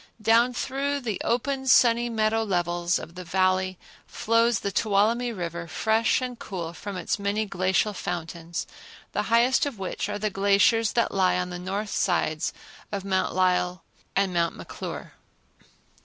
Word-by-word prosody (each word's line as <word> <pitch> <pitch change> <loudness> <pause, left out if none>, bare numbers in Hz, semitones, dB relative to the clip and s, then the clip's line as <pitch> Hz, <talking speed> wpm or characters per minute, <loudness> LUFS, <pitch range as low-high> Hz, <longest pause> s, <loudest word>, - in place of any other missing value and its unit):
Down 230 +3 +4
through 275 +3 -2
the 220 -6 -3
open 265 +3 -1
sunny 240 -1 +5
meadow 220 0 +1
levels 175 -3 0
of 165 - -9
the 180 +1 -8
Valley 185 +1 +1 0.3
flows 230 0 +2
the 200 - -2
Tuolumne 220 +4 +2
River, 170 -1 -4
fresh 220 +8 +1
and 250 -2 -5
cool 170 -4 -5
from 195 +3 -6
its 180 - -2
many 200 +2 0
glacial 190 +2 +1
fountains, 170 -2 -4 0.5
the - - 0
highest 240 +4 +4
of 270 -6 -6
which 195 +1 -3
are 205 - -2
the 210 0 -2
glaciers 200 +3 +3
that 235 - +1
lie 185 -2 +3
on 180 0 -2
the 175 - -5
north 200 +3 -3
sides 155 -3 0 0.4
of 200 -2 -4
Mount 190 -2 0
Lyell 180 -1 +1 0.3
and 195 -2 +1
Mount 170 -1 +1
McClure. - - -7
200 Hz, 155 wpm, -26 LUFS, 180-230 Hz, 0.5 s, sunny